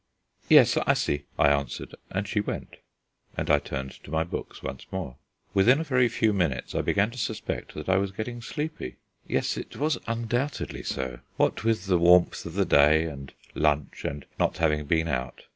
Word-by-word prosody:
"Yes, - - +7
I - - +3
see," 70 0 -1
I 70 - +5
answered; 70 -1 -1 0.2
and 100 +2 -2
she 105 - 0
went, 105 - -4 0.6
and - - 0
I 75 - +5
turned 65 -2 -5
to - - -12
my 80 +1 +1
books 85 - -7
once - - -6
more. 90 -10 -5 0.4
Within 120 +9 +5
a - - -1
very 125 -5 +3
few 110 -1 +2
minutes 80 -10 -1
I - - +1
began 105 +3 +1
to 125 - -8
suspect 110 -1 -4
that 75 - -6
I 95 0 +4
was 100 0 +1
getting 120 +4 -5
sleepy. 150 - -5 0.3
Yes, - - 0
it - - -7
was 150 +1 0
undoubtedly 120 +5 -2
so. 65 -2 -4 0.2
What - - +1
with 110 -4 +1
the 90 -2 +3
warmth 90 0 +4
of 85 - -8
the 100 -1 +2
day, 75 +1 +5
and 70 -4 -7 0.2
lunch, 75 -2 0
and 70 -1 -4
not - - +1
having 75 -2 +1
been 80 +1 +2
out.... 65 -4 -3
90 Hz, 190 wpm, -27 LUFS, 75-110 Hz, 0.6 s, Yes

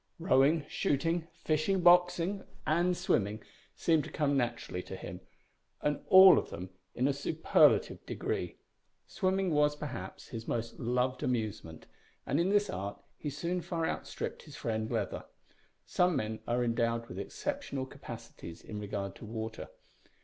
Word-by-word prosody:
Rowing, 150 -1 +3
shooting, 165 +4 0 0.2
fishing, 160 +5 +1
boxing, 180 +2 +4 0.2
and 175 +3 +2
swimming 105 +2 0 0.3
seemed 160 -3 +2
to - - -7
come 145 -2 +1
naturally 120 -7 -1
to 95 - -8
him, 90 -1 -8 0.6
and 150 0 -1
all 190 -1 +9
of - - -6
them 90 +2 -7 0.2
in 130 - +2
a 140 - +2
superlative 155 +3 +3
degree. - - -3 0.5
Swimming 190 -2 0
was, 150 -1 +3
perhaps, 130 -11 -7
his 115 -1 -7
most 115 0 -3
loved 125 +2 0
amusement 110 -10 -3 0.4
and 145 - +1
in 175 +3 +2
this 205 0 +3
art 100 - -5 0.2
he 150 - -5
soon 175 +5 -2
far 165 -1 -2
outstripped - - -4
his - - -12
friend 110 -1 -2
Leather. 110 -4 -2 0.6
Some 180 -1 +2
men 110 +1 -2
are 120 +1 +1
endowed 115 0 0
with 95 - -7
exceptional 275 - -3
capacities 85 -9 -10
in 105 - -6
regard 100 -1 -4
to - - -10
water. 110 0 -5
135 Hz, 145 wpm, -32 LUFS, 110-170 Hz, 0.6 s, all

